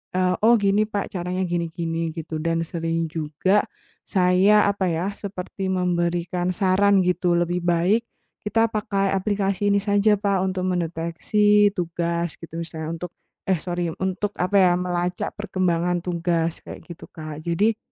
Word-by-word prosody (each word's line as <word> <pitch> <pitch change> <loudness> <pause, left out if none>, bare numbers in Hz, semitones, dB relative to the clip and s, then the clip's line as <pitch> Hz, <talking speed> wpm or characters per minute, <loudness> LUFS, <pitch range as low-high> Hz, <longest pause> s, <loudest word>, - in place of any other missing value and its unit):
eee, 185 0 +2
"Oh, 235 +2 +6
gini, 205 0 +2
Pak, 205 -2 -3
caranya 180 0 -2
gini-gini", 165 -1 -2
gitu, 160 -1 -5
dan 165 0 0
sering 165 0 -2
juga 160 +6 +1 0.4
saya, 190 +3 +4
apa 200 -1 -1
ya, 175 +4 -1
seperti 195 -1 -6
memberikan 175 -1 0
saran 195 +1 +3
gitu, 180 0 +1
"Lebih 175 +1 0
baik 175 +7 +2 0.4
kita 225 +2 +1
pakai 195 -2 -1
aplikasi 200 0 0
ini 200 - +2
saja, 205 +1 +3
Pak, 200 -2 0
untuk 185 -1 -2
mendeteksi 180 +4 +2
tugas", 170 -1 -2
gitu, 165 - -11
misalnya 160 -1 -5
untuk 170 +1 -6 0.3
eh, 185 -5 +1
sori, 175 -1 -2
untuk, 190 +2 -1
apa 185 +3 +2
ya, 185 -2 +5
melacak 180 0 -1
perkembangan 180 -4 0
tugas 170 -2 -1
kayak - - -9
gitu, 170 -1 -11
Kak. 155 -1 -9
Jadi, 205 +6 +1
180 Hz, 145 wpm, -23 LUFS, 170-200 Hz, 0.4 s, Oh